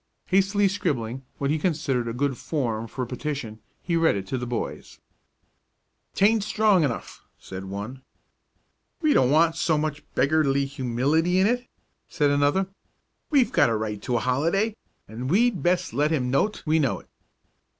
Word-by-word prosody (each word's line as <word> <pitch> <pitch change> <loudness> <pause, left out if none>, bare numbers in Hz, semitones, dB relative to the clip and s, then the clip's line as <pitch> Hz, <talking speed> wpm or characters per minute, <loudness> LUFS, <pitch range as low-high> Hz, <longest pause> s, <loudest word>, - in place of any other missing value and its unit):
Hastily 195 +1 +3
scribbling 130 - -2
what 140 0 -1
he 155 - 0
considered 145 -7 0
a 115 - -3
good 135 +2 0
form 115 -6 -2
for 130 +3 -4
a - - -5
petition, 125 -4 -5 0.2
he 170 - -1
read 165 -5 +3
it 95 -1 -4
to 130 - -1
the 125 - -4
boys. 120 -1 -5 1.2
"'Taint 215 +1 +3
strong 210 -4 +3
enough," 130 -6 -4 0.2
said 95 0 -8
one. 100 +7 -6 1.0
"We 305 -1 +4
don't 125 - +4
want 160 +3 +3
so 160 -2 +2
much 150 -1 -2
beggarly 140 -2 +2
humility 140 +7 0
in 190 - +4
it," 245 +3 0 0.4
said 145 -4 +1
another. 145 +7 +2 0.6
"We've 275 -6 +3
got 145 -7 +4
a 115 - +1
right 105 -1 -4
to 125 - -2
a - - -1
holiday, 170 - +1 0.3
and 120 +5 -5
we'd 215 +3 +2
best 175 -8 +1
let 145 +4 +2
him 130 -6 0
know't 205 +11 0
we 160 +1 +3
know 140 -5 0
it." - - -26
145 Hz, 165 wpm, -25 LUFS, 125-180 Hz, 1.2 s, We